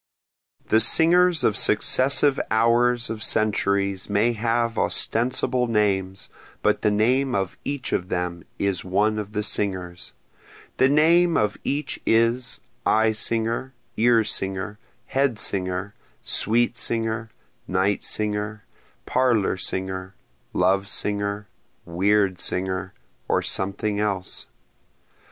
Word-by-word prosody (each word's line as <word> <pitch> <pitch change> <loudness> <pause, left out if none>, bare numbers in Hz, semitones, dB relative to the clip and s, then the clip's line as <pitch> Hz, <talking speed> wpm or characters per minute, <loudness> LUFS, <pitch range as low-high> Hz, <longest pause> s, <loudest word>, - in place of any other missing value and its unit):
The 110 - +4
singers 165 +6 +4
of 110 - +2
successive 135 +6 +3
hours 120 +2 +2
of 110 -1 -6
centuries 100 -2 0
may 105 +4 +2
have 115 +1 -1
ostensible 125 +1 +1
names, 95 -4 -1 0.4
but - - +2
the 105 - +2
name 125 +5 +1
of 95 -2 -2
each 140 -2 -4
of 90 +1 -2
them 90 -1 -3
is 100 -3 -1
one 105 +4 0
of 105 0 -7
the 105 - -1
singers, 90 -4 -3 0.6
The 130 - +4
name 165 +4 +4
of 105 -1 0
each 145 +2 -3
is, 115 +2 +1 0.2
eye 110 0 +3
singer, 115 +4 -2 0.2
ear 115 0 +3
singer, 95 +1 -3 0.3
head 135 -4 0
singer, 95 0 -2 0.3
sweet 120 +2 +2
singer, 115 -1 -1 0.4
night 95 +2 0
singer, 105 0 -2 0.4
parlor 120 -7 +1
singer, 95 0 -3 0.4
love 95 +2 +1
singer, 100 0 -3 0.4
weird 95 +2 +1
singer, 95 0 -2 0.3
or - - +1
something 100 +2 -1
else. 100 -4 -3
105 Hz, 110 wpm, -23 LUFS, 95-120 Hz, 0.6 s, The